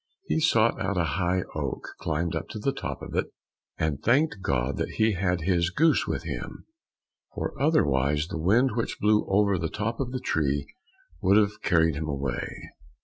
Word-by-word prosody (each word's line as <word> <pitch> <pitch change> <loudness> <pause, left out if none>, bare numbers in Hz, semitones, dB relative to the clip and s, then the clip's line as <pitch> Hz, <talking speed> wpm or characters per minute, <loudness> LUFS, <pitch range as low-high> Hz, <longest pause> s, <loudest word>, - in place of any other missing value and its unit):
He 160 - 0
sought 115 -8 +3
out 95 0 -1
a 90 - +3 0.2
high 90 +1 +1
oak, - - -4
climbed 85 +1 -1
up - - -4
to - - -6
the 135 +6 0
top - - -5
of - - -8
it, - - 0 0.5
and 75 -3 -1
thanked 130 -3 +2
God 65 -4 0
that - - -3
he 110 0 +3
had 90 -2 0
his 85 0 +1
goose 155 - +3
with - - -2
him, - - -6 0.7
for - - -3
otherwise 75 - +2
the 85 - -5
wind 120 +10 +3
which 115 - -2
blew 105 0 +3
over 100 -1 +3
the 80 0 -2
top 110 +6 -3
of 135 -3 -1
the 130 - -3
tree 70 - 0 0.6
would 95 +1 +5
have 105 -1 +1
carried 80 -3 +3
him 80 0 -3
away. 70 -4 -4
95 Hz, 185 wpm, -27 LUFS, 80-110 Hz, 0.7 s, would